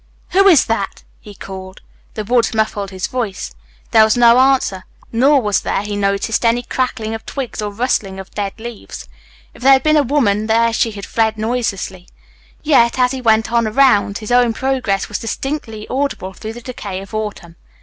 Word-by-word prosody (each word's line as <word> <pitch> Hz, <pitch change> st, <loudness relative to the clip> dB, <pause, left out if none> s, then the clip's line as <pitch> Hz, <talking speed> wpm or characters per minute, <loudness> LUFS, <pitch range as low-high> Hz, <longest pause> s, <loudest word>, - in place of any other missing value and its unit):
"Who 390 Hz, +2 st, +5 dB
is 335 Hz, -8 st, +6 dB
that?" 225 Hz, -4 st, -3 dB, 0.2 s
he 205 Hz, -1 st, -13 dB
called. 190 Hz, 0 st, -9 dB, 0.3 s
The 215 Hz, -, -3 dB
woods 235 Hz, +1 st, +1 dB
muffled 215 Hz, -2 st, -1 dB
his 190 Hz, -1 st, -4 dB
voice. 230 Hz, -6 st, -4 dB, 0.4 s
There 220 Hz, -2 st, +7 dB
was 220 Hz, +2 st, +2 dB
no 240 Hz, 0 st, +6 dB
answer. 260 Hz, -8 st, +2 dB, 0.3 s
Nor 265 Hz, +3 st, +3 dB
was 205 Hz, -1 st, +1 dB
there, 195 Hz, -, -1 dB
he 205 Hz, 0 st, -4 dB
noticed, 200 Hz, +3 st, 0 dB
any 235 Hz, +1 st, +2 dB
crackling 240 Hz, -4 st, -2 dB
of 225 Hz, -, -6 dB
twigs 260 Hz, -5 st, -5 dB
or 210 Hz, -1 st, -3 dB
rustling 200 Hz, -4 st, -1 dB
of 190 Hz, -, -10 dB
dead 200 Hz, -2 st, -3 dB
leaves. 235 Hz, -1 st, -9 dB, 0.5 s
If -, -, -16 dB
there 270 Hz, +2 st, +6 dB
had 265 Hz, -, +3 dB
been 310 Hz, 0 st, +4 dB
a -, -, +5 dB
woman 230 Hz, -7 st, +1 dB
there 230 Hz, +1 st, +2 dB
she 225 Hz, -, +1 dB
had 200 Hz, -3 st, -8 dB
fled 220 Hz, -1 st, 0 dB
noiselessly, 215 Hz, -5 st, -3 dB, 0.6 s
yet, 265 Hz, -6 st, +3 dB
as 250 Hz, -1 st, +3 dB
he 265 Hz, -1 st, -4 dB
went 225 Hz, -1 st, +2 dB
on 235 Hz, -1 st, +2 dB
around 245 Hz, -2 st, +4 dB
the -, -, -7 dB
lake, 200 Hz, -, -5 dB
his 215 Hz, +1 st, -7 dB
own 245 Hz, -1 st, +4 dB
progress 255 Hz, -6 st, -1 dB
was 210 Hz, -, -4 dB
distinctly 225 Hz, -3 st, -5 dB
audible 260 Hz, -8 st, -3 dB
through 215 Hz, +3 st, -7 dB
the 240 Hz, -, -10 dB
decay 205 Hz, -6 st, -6 dB
of 195 Hz, -, -13 dB
autumn. 210 Hz, -6 st, -5 dB
225 Hz, 195 wpm, -17 LUFS, 205-250 Hz, 0.6 s, There